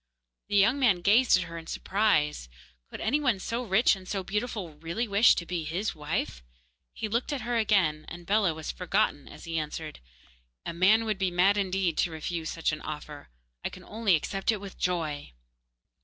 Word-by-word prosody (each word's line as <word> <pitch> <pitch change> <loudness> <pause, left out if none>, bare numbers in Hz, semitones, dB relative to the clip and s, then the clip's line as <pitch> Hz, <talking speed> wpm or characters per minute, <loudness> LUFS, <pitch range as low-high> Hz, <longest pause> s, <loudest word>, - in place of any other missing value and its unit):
The 205 - -2
young 210 +8 +4
man 210 -10 +3
gazed 220 +4 +5
at 180 - -1
her 165 0 -7
in 165 - -12
surprise. 150 - 0 0.4
Could - - -8
any 295 - +1
one 255 -8 +2
so 230 +5 -3
rich 215 +1 +4
and 185 -1 -12
so 195 -2 -2
beautiful 210 -3 -3
really 170 +9 -2
wish 205 +3 +5
to 170 - -3
be 170 -2 -3
his 175 +8 -2
wife? 150 - -3 0.5
He 220 - -4
looked 235 +6 -1
at 285 -3 -2
her 240 0 -2
again, 185 -9 +2
and 175 0 -9
Bellah 200 -4 +2
was 160 -1 -5
forgotten 180 -5 0
as - - -12
he 165 -1 -2
answered: 155 0 -6 0.7
'A - - -3
man 205 +6 +4
would 215 -3 -1
be 190 -1 +1
mad 180 +3 +3
indeed 190 -4 0
to - - +2
refuse 160 0 -4
such 165 - -1
an 155 - -5
offer. 150 - -7 0.3
I - - -1
can - - -12
only 215 -4 +1
accept 195 +7 -1
it 215 - -2
with 195 -1 -10
joy. 155 - -2
190 Hz, 195 wpm, -28 LUFS, 165-215 Hz, 0.7 s, gazed